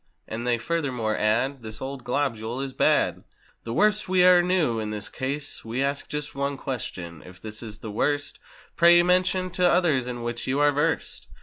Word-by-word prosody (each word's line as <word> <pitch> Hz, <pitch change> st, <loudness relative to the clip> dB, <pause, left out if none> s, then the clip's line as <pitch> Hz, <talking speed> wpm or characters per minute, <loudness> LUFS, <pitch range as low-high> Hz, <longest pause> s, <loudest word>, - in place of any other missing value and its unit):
And 115 Hz, +2 st, -5 dB
they 120 Hz, -1 st, +2 dB
furthermore 125 Hz, -6 st, -1 dB
add: 120 Hz, +6 st, 0 dB
"This 110 Hz, -1 st, -7 dB
old 135 Hz, -1 st, -6 dB
globule 125 Hz, -3 st, -2 dB
is 135 Hz, -1 st, -4 dB
bad!" -, -, +2 dB, 0.4 s
"The 115 Hz, -, -4 dB
worst 210 Hz, -, +2 dB
we 185 Hz, -1 st, +4 dB
e'er 180 Hz, -1 st, +7 dB
knew!" 175 Hz, -10 st, +1 dB
In 110 Hz, -1 st, -3 dB
this 105 Hz, -1 st, -5 dB
case 140 Hz, +2 st, -4 dB
We 120 Hz, +4 st, -2 dB
ask 140 Hz, +1 st, -2 dB
just 150 Hz, 0 st, -4 dB
one 140 Hz, 0 st, -2 dB
question—If 90 Hz, -, -7 dB
this 110 Hz, +2 st, -7 dB
is 110 Hz, -3 st, -8 dB
the 110 Hz, -, -7 dB
worst 145 Hz, +7 st, -1 dB, 0.4 s
Pray 170 Hz, +1 st, +6 dB
mention 185 Hz, +1 st, +2 dB
the 180 Hz, 0 st, +2 dB
others 155 Hz, -8 st, +2 dB
in 120 Hz, -1 st, -5 dB
which 120 Hz, 0 st, -4 dB
you 135 Hz, +2 st, 0 dB
are 145 Hz, 0 st, +5 dB
versed. 145 Hz, +1 st, -1 dB
135 Hz, 185 wpm, -25 LUFS, 115-160 Hz, 0.4 s, e'er